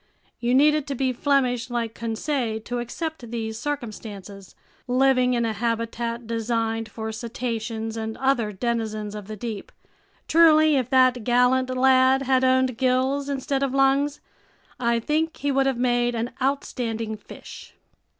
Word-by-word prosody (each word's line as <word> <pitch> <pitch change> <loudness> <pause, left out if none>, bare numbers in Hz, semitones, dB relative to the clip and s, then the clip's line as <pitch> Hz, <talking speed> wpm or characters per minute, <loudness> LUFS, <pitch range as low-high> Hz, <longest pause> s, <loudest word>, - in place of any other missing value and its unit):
You 245 +1 +1
needed 300 +1 +4
to 280 - -3
be 260 0 0
Flemish 250 -3 +1
like 235 -2 -2
Conseil 230 0 -2
to 245 +2 -4
accept 255 +1 -5
these 220 -1 -4
circumstances, 210 -8 -6 0.3
living 255 0 +3
in 235 -1 +1
a 225 - -1
habitat 230 +1 -2
designed 225 -1 -2
for 220 0 -5
cetaceans 225 -1 -4
and 220 0 -4
other 260 -5 +1
denizens 215 -1 -3
of 210 -2 -8
the 215 - -6
deep. 215 -1 -6 0.6
Truly, 310 -2 +6
if 255 -3 0
that 255 -2 +4
gallant 250 +2 +3
lad 260 +1 +4
had 260 -1 +2
owned 260 -1 +2
gills 265 +2 +1
instead 275 0 -1
of 275 -1 -1
lungs, 275 +2 +2 0.6
I 235 -1 +1
think 310 +6 -1
he 285 - -1
would 270 0 +2
have 265 -3 0
made 240 -1 +1
an 230 +2 -2
outstanding 230 -5 -2
fish! 210 - -12
245 Hz, 145 wpm, -24 LUFS, 225-270 Hz, 0.6 s, Truly